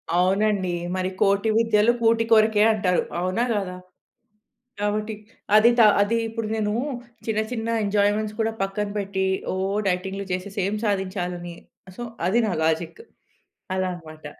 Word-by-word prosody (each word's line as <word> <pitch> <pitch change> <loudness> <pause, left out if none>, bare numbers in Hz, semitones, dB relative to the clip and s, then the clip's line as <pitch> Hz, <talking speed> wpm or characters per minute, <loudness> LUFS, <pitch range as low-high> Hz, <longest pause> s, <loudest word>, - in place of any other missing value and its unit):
అవునండి. 190 +1 +2 0.2
మరి 185 0 -1
కోటి 200 +2 +3
విద్యలు 225 0 +4
కూటి 230 0 +3
కొరకే 215 -1 +5
అంటారు. 190 -4 +1 0.2
అవునా? 185 +6 0
గాదా? 195 -3 -2 1.0
కాబట్టి, 210 +1 -1 0.4
అది 215 +2 +7
తా 225 - +8 0.2
అది 225 +3 +2
ఇప్పుడు 225 -1 -4
నేను 210 -1 -1 0.5
చిన్న, 220 -1 0
చిన్న 225 -2 -3 0.2
ఎంజాయ్‌మెంట్స్ 205 +1 +1
కూడా 225 0 +1
పక్కన 195 +1 -1
పెట్టి, 195 -1 -2 0.3
ఒ - - -2 0.3
డైటింగ్లు 190 +2 -2
చేసేసి 195 +2 -4
ఏం 205 - -2
సాధించాలని? 180 -3 -2 0.4
సో, - - -7 0.3
అది 215 +6 +3
నా 200 - -1
లాజిక్. 160 - -1 0.7
అలా 185 0 0
అన‌మాట. 155 -2 -13
205 Hz, 135 wpm, -24 LUFS, 185-215 Hz, 1.0 s, తా